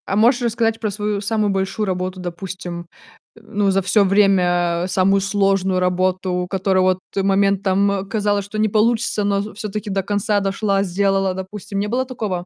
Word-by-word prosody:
А 195 - -1
можешь 240 +4 +4
рассказать 225 -1 0
про 220 -2 -1
свою 205 0 -2
самую 215 0 0
большую 195 +3 -1
работу, 185 -1 -3
допустим, 175 -1 -6 0.5
ну, 210 -3 -1
за 195 +1 +2
всё 195 +3 +3
время 180 -3 +2
самую 195 +1 +2
сложную 195 -2 +1
работу, 180 0 0
которая 190 0 +1
вот 185 0 +2 0.2
момент, 195 0 +2
там, 195 0 +1
казалось, 205 -2 0
что 205 +2 -7
не 215 - +3
получится, 220 0 +1
но 200 0 +1
в 210 +1 -7
всё-таки 210 +1 -5
до 195 0 -1
конца 205 +1 0
дошла, 195 0 0
сделала, 195 0 +1
допустим. 195 +2 -6
Не 205 - -1
было 250 +4 -1
такого? 210 -9 -4
195 Hz, 170 wpm, -20 LUFS, 185-210 Hz, 0.5 s, можешь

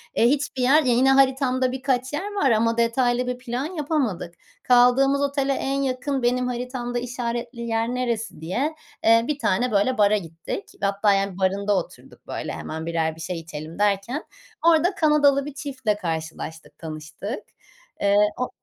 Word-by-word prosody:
eee, 230 - +4
hiçbir 265 -1 0
yer 280 +5 +5
ya 250 -3 +3
yine 260 +3 +4
haritamda 265 -1 +3
birkaç 260 0 -1
yer 395 +8 -3
var 280 - +2
ama 230 +1 +2
detaylı 245 +1 +1
bir 250 0 -2
plan 250 +2 -4
yapamadık. 290 - -2 0.3
Kaldığımız 255 +3 +4
otele 280 -1 +1
en 275 +1 -1
yakın 265 0 -2
benim 250 +1 +1
haritamda 245 0 -3
işaretli 240 0 -4
yer 230 -1 -1
neresi 235 -8 -2
diye, 255 - -2 0.3
eee, 230 +1 +5
bir 295 -1 -2
tane, 245 +1 +1
böyle, 210 +5 +2
bara 210 0 +4
gittik 165 +2 -6 0.2
hatta 200 +1 +2
yani 195 -1 -1
barında 200 +2 +1
oturduk 180 - -8
böyle - - -4
hemen 160 +1 -6
1'er 160 -1 -1
bir 165 - -11
şey 175 +1 -4
içelim 155 +1 -8
derken 205 - 0 0.4
orada 335 +3 +4
Kanadalı 290 -4 +3
bir 295 - -6
çiftle 260 -6 -2
karşılaştık 160 -3 -5
tanıştık. 160 - -6 0.6
Eee, 200 0 +3 0.2
o 250 - -1
245 Hz, 160 wpm, -24 LUFS, 200-270 Hz, 0.6 s, yer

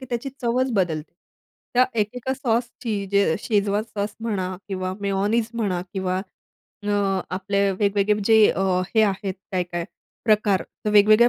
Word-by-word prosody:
की - - -7
त्याची 240 +2 -2
चवच 250 +2 +1
बदलते. 170 -7 -1 0.6
त्या 250 +1 +6 0.2
1-1 240 +5 -3
अ, - - +3
सॉसची 235 -4 -1
जे 200 0 +4
अ, - - 0
शेजवान 205 -1 +1
सॉस 215 -2 -4
म्हणा 190 -5 -2
किंवा 185 -1 -2
मेयोनीज 205 +3 +1
म्हणा 195 -6 0
किंवा 185 -2 -1 0.7
अ, 205 - -2 0.4
आपले 200 +1 +1
वेगवेगळे 205 +1 +1
जे 220 0 +7
अ, 195 - -1 0.3
हे 220 - +6
आहेत 195 -2 0 0.2
काय-काय 175 -2 -1 0.4
प्रकार. 210 -3 +3 0.2
तर 210 - +1
वेगवेगळ्या 215 +3 +7
205 Hz, 150 wpm, -23 LUFS, 195-225 Hz, 0.7 s, जे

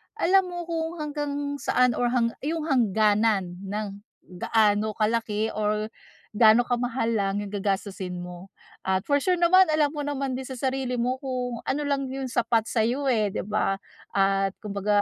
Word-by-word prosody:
alam 385 +2 +4
mo 350 -1 -5
kung 325 0 -2
hanggang 295 -1 -3 0.3
saan 250 -1 +3
or 245 - +1
hang 240 -1 +2 0.2
yung 320 +1 -1
hangganan 215 -6 +2
ng 205 0 -4 0.4
gaano 215 0 +2
kalaki 220 0 0
or 215 0 -1 0.4
gaano 220 +2 +6
ka-mahal 245 -1 -1
lang 200 -2 0
yung 200 - -7
gagastusin 195 -3 -3
mo. 180 +1 -9 0.4
At 190 +1 +1
for 285 - +5
sure 365 +4 +2
naman 370 +2 +6
alam 300 -1 +3
mo 300 - -6
naman 275 -3 -2
din 265 - -6
sa 260 - -6
sarili 260 0 -1
mo 255 +2 0
kung 250 -3 -3
ano 295 +2 -1
lang 280 -1 0
yung 270 -1 -4
sapat 230 -1 +1
sa'yo 250 +5 +1
eh, 210 -4 +1
di - - -1
ba? 205 -1 0 0.4
At 195 0 +2
kumbaga 205 0 +1
230 Hz, 165 wpm, -26 LUFS, 205-270 Hz, 0.4 s, gaano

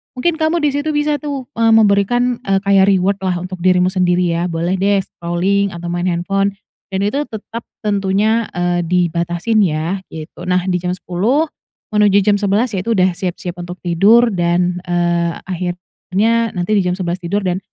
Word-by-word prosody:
mungkin 320 +6 -1
kamu 315 +2 +1
di 295 - +4
situ 290 +2 -1
bisa 295 0 +1
tuh, 280 -4 -5
eee, 225 0 +4
memberikan, 225 +4 +3
eee, 195 0 +2
kayak 195 -1 +4
reward 190 +2 0
lah 185 -1 0
untuk 185 0 -7
dirimu 185 0 +3
sendiri 180 -1 +1
ya, 175 +1 -1
boleh 170 +2 -1
deh 200 0 +2
scrolling 185 +3 -1
atau 170 0 -6
main 175 +1 -1
handphone 195 +3 0 0.4
dan 190 - -1
itu 210 +8 0
tetap 225 +1 -7 0.2
tentunya, 210 +2 +1
eee, 175 0 0
dibatasin 175 +4 0
yah, 170 +2 -1
gitu. 160 +2 -9
Nah, 180 0 +1
di 180 -1 +1
jam 180 0 -2
10 220 - 0 0.4
menuju 205 -2 +4
jam 205 0 +3
11 210 +4 +1
yaitu 220 +5 -1
udah 185 -1 +3
siap-siap 180 -1 -4
untuk 175 +1 -7
tidur 210 +8 +4
dan, 175 -1 0
eee, 170 -1 +1
akhirnya 190 +5 -1
nanti 180 +3 -2
di 200 - +3
jam 180 - 0
11 180 -1 -3
tidur 190 +3 -2
dan 185 0 -1
190 Hz, 175 wpm, -17 LUFS, 175-210 Hz, 0.4 s, di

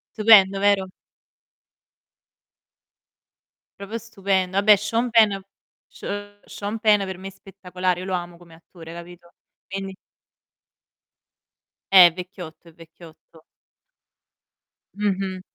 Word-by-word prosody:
Stupendo, 200 -3 +5
vero? 200 -2 +1 2.9
Proprio 200 +3 -6
stupendo. 195 -4 -2
Vabbè, 210 +1 +6
Sean 225 +4 -2
Penn 215 -4 +3 0.5
Se 205 0 -8
Sean 210 +2 -6
Penn 210 -2 +3
per 190 -1 -7
me 190 +1 -9
è - - -14
spettacolare, 185 -2 -4
io - - -7
lo 190 - -4
amo 175 -1 -4
come 170 -1 -18
attore, 165 0 -14
capito, 170 0 -12 0.4
quindi 195 0 -6 2.0
Eh, 185 -2 +9
è 170 - -3
vecchiotto, 180 -2 -10
è - - -20
vecchiotto. 165 -1 -18 1.5
Mh-mh. 195 -2 -2
190 Hz, 105 wpm, -22 LUFS, 175-205 Hz, 2.9 s, Eh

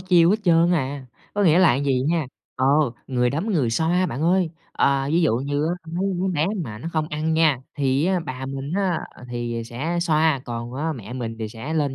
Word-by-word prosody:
chiêu 180 -2 +4
hết 210 - +4
trơn 170 0 +4
à, 135 -4 -2 0.3
có 205 - +1
nghĩa 170 -2 +5
là 165 -9 +5
vầy 130 -2 +2
nha, 165 -3 +1 0.3
ờ, 130 +1 +1 0.4
người 125 -2 +1
đấm, 165 +10 -2
người 145 - +1
xoa 170 +9 +2
bạn 135 +2 -4
ơi. 180 0 +2 0.2
À, 135 0 +2
ví 170 - +3
dụ 115 -8 +3
như 145 +3 -1
á, 175 - 0 0.2
mấy 180 +3 -1
đứa 180 +2 -1
bé 155 +3 +2 0.2
mà 105 -4 -7
nó 165 - -5
không 155 -1 -1
ăn 160 0 -1
nha, 160 -5 +3 0.2
thì 135 +2 +2
á 185 -1 +1
bà 135 -4 -6
mình 135 +3 -5
á 190 -4 +1 0.3
thì 120 -1 -3
sẽ 145 +10 -3
xoa, 160 -3 +2
còn 120 +1 -5
á 160 +3 -1
mẹ 115 -3 -8
mình 115 -3 -4
thì 110 -1 -3
sẽ 120 +8 -6
lên 145 -4 0
150 Hz, 220 wpm, -23 LUFS, 130-170 Hz, 0.4 s, nghĩa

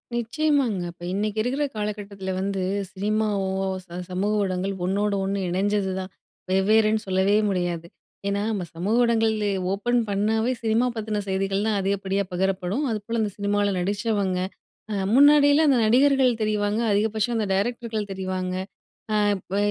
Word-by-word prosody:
நிச்சயமாங்க, 250 - +1
இப்ப 175 0 -16
இன்னைக்கு 210 +1 -2
இருக்குற 265 +6 -1
காலகட்டத்தில 205 -2 -4
வந்து, 195 0 -2 0.3
சினிமாவோ 205 -1 0 0.3
ச - - -28 0.2
சமூக 195 +3 0
ஊடகங்கள் 190 0 -1
ஒண்ணோடு 200 +2 0
ஒண்ணு 195 +1 -1
இணஞ்சதுதான், 190 0 -1 0.4
வெவ்வேறுன்னு 215 +3 +3
சொல்லவே 190 +2 +2
முடியாது. 175 -3 -2 0.4
ஏன்னா, 200 0 0
நம்ம 200 -4 -2
சமூக 195 +7 0
ஊடங்கள்ள 220 -2 +2 0.3
ஓப்பன் 240 +4 +1
பண்ணாவே, 220 +4 +1
சினிமா 225 +3 +2
பத்தின 215 -1 -2
செய்திகள் 195 +1 0
தான் 210 -2 +1
அதிகப்படியா 195 0 0
பகிரப்படும். 190 +6 -1
அதுபோல, 220 +2 -3
அந்த 205 - -2
சினிமால 205 0 +1
நடிச்சவங்க 200 0 0 0.5
அ - - -1 0.2
முன்னாடியெல்லாம் 290 +2 +6
அந்த 270 - +4
நடிகர்கள் 265 +2 +4
தெரிவாங்க, 210 0 0
அதிகபட்சம் 220 +3 +1
அந்த 220 - +1
டைரக்டர்கள் 220 0 -2
தெரிவாங்க. 185 -1 -3 0.6
அ - - +2 0.2
இப்ப 190 +1 -7
205 Hz, 130 wpm, -24 LUFS, 190-220 Hz, 0.6 s, முன்னாடியெல்லாம்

